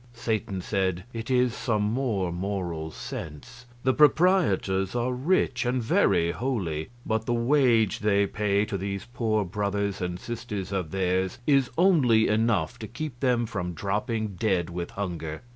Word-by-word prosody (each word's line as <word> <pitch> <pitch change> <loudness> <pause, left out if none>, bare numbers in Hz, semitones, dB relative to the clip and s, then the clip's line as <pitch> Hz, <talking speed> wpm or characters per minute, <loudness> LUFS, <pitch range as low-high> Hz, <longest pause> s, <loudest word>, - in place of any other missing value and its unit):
Satan 110 -4 -2
said: 95 -3 -1
"It 115 +1 -5
is 125 -2 +3
some 110 -4 0
more 105 -5 0
Moral 85 -3 -3
Sense. 80 - -8 0.2
The 130 0 +3
proprietors 145 - +3
are 120 +1 0
rich, 135 -1 +1
and 125 +1 0
very 90 -7 +2
holy; 90 - -2 0.2
but 110 0 -1
the 120 - +1
wage 120 -4 +3
they 100 -1 +3
pay 100 0 0
to 100 -2 -4
these 100 +1 -4
poor 110 -4 0
brothers 100 +1 -2
and 90 0 -3
sisters 110 -5 -5
of 95 -5 -2
theirs 95 +1 0
is 135 -4 +3
only 140 - +4
enough 105 -6 +1
to 110 - -6
keep 125 +1 -6
them 125 -3 +2
from 90 -5 -4
dropping 105 +4 -1
dead 95 -6 0
with 85 0 -4
hunger. 85 -5 -5
105 Hz, 150 wpm, -26 LUFS, 95-120 Hz, 0.2 s, only